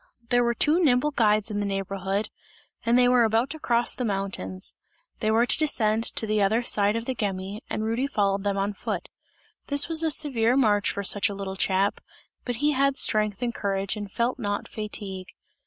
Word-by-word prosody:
There 245 -1 +3
were 235 0 0
two 315 +8 +2
nimble 275 0 +3
guides 215 -4 +2
in 205 - -2
the 205 - -1
neighbourhood, 195 +1 -3 0.5
and 235 +1 +3
they 250 0 +5
were 245 -1 +4
about 225 +3 +1
to 315 - -7
cross 240 -3 +2
the 250 - -4
mountains; 190 - -3 0.5
they 215 - 0
were 225 +2 +3
to - - +3
descend 225 -7 +2
to - - +1
the 215 -1 0
other 220 +5 +2
side 205 -2 +3
of 230 0 -3
the 260 - -2
Gemmi, 200 -2 -4
and 215 - -3
Rudy 230 +5 -1
followed 200 -6 0
them 200 -1 -1
on 200 +1 -1
foot. - - -5 0.6
This 285 0 +2
was 325 -1 +2
a 325 - +2
severe 260 -5 +3
march 210 -6 +2
for 200 - -3
such 200 +1 +2
a 200 - -5
little 195 -1 -5
chap, 195 +1 0 0.4
but 245 - -2
he 300 - +4
had 275 0 +1
strength 215 0 +1
and 240 -1 -1
courage, 195 -1 -2
and 205 -2 -7
felt 240 +4 -1
not 205 -3 -3
fatigue. 200 -3 -6
215 Hz, 205 wpm, -25 LUFS, 200-245 Hz, 0.6 s, they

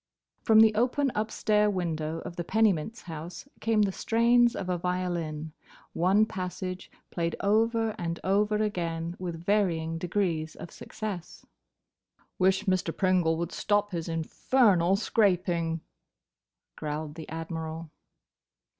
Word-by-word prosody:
From 220 -1 +6
the 220 -1 +6
open 255 +5 +1
upstair 210 0 +1
window 165 -4 -2
of 170 - -8
the 175 - -3
Pennymint's 220 +1 +1
house 165 - -8
came 220 -2 +2
the 200 - +1
strains 235 +3 +3
of 185 - -4
a 180 - 0
violin: 170 -3 -3 0.4
one 190 +5 +3
passage, 185 -2 -5 0.2
played 170 -1 -1
over 225 +2 +2
and 170 -1 -3
over 205 +2 +2
again, 170 -5 -2
with 170 -2 -5
varying 165 -6 +1
degrees 170 -3 -1
of 170 - -9
success. 200 -6 -7 0.9
"Wish 190 +2 +3
Mr. 185 -4 0
Pringle 180 -4 +2
would 170 +1 -3
stop 205 0 0
his 170 -1 -4
infernal 180 +3 +2
scraping," 180 -6 +1 0.9
growled 150 0 -4
the 160 0 -9
Admiral. 160 0 -5
180 Hz, 120 wpm, -28 LUFS, 165-210 Hz, 0.9 s, From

